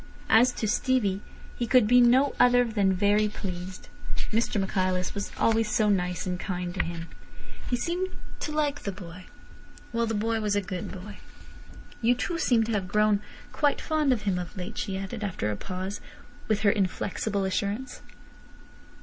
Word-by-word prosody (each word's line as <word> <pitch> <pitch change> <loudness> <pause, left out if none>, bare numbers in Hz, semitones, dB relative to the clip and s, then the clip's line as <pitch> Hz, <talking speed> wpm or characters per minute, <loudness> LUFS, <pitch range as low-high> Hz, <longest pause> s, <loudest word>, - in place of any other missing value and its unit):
As 240 +3 +6
to 220 - -2
Stevie, 205 -4 +1 0.3
he 240 - -2
could 250 -1 +5
be 245 +3 +6
no 255 +4 +5
other 245 0 +6
than 205 -4 +2
very 205 +3 +3
pleased. 185 -3 -6 0.4
Mr 225 -1 +1
Michaelis 185 -1 0
was 200 -1 -4
always 225 -1 +2
so 215 -1 +2
nice 180 -3 0
and 180 -1 -2
kind 180 -1 -3
to 190 - 0
him. 165 -1 -5 0.6
He 245 - +2
seemed 350 +8 -1 0.3
to 300 - -3
like 300 -2 0
the 200 - -3
boy. 185 -2 -10 0.7
Well, 230 0 +1
the 225 - -1
boy 225 +1 0
was 210 -1 0
a - - +3
good 185 -1 -5
boy. 200 +2 -9 0.8
"You 240 +2 +4
too 335 +7 -2
seem 240 -7 +3
to 225 - -3
have 200 -4 -1
grown 210 +1 +3 0.3
quite 290 -2 +1
fond 310 -3 +1
of 235 -4 0
him 190 -3 0
of 180 +3 -7
late," 185 +4 -5
she 195 -2 -2
added, 195 +3 -5
after 180 - -2
a - - -2
pause, 185 - -5 0.5
with 215 -1 +1
her 200 - +5
inflexible 200 +1 -1
assurance. 200 +7 -2
210 Hz, 175 wpm, -27 LUFS, 190-235 Hz, 0.8 s, As